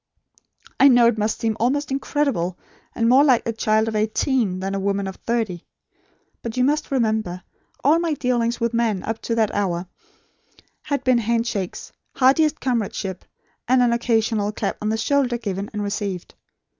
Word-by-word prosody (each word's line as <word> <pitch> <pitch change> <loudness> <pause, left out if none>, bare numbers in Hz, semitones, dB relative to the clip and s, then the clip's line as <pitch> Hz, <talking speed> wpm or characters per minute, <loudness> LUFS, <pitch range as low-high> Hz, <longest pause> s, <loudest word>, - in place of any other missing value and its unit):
I 275 - +8
know 245 -3 +6
it 235 -2 +2
must 215 +1 0
seem 225 -1 0
almost 275 +5 0
incredible, 270 -10 -1 0.4
and 230 - +1
more 260 +4 +6
like 260 -5 +3
a 230 - -1
child 220 0 +1
of 220 - -3
eighteen, 215 -2 0
than 195 +1 -3
a 195 - -1
woman 200 0 -1
of 190 0 -6
thirty. 225 -7 -3 0.7
But 230 +1 -6
you 250 - +3
must 295 +3 +1
remember, 220 -8 -1 0.4
all 300 +5 +4
my 335 -3 0
dealings 240 -3 0
with 235 0 -1
men 225 -5 0
up 225 0 -4
to 230 - -2
that 220 -2 +1
hour 185 -3 -1 1.0
had 285 -3 -2
been 255 -2 +3
handshakes, 230 -4 -2 0.2
heartiest 275 +4 +3
comradeship, 210 -6 -2 0.4
and 250 +1 +4
an 240 -1 +3
occasional 225 -3 +1
clap 210 -1 -3
on 210 - -1
the 220 - 0
shoulder 250 +1 +1
given 200 -3 -4
and 210 -1 -3
received. 200 -3 -4
230 Hz, 170 wpm, -22 LUFS, 205-250 Hz, 1.0 s, I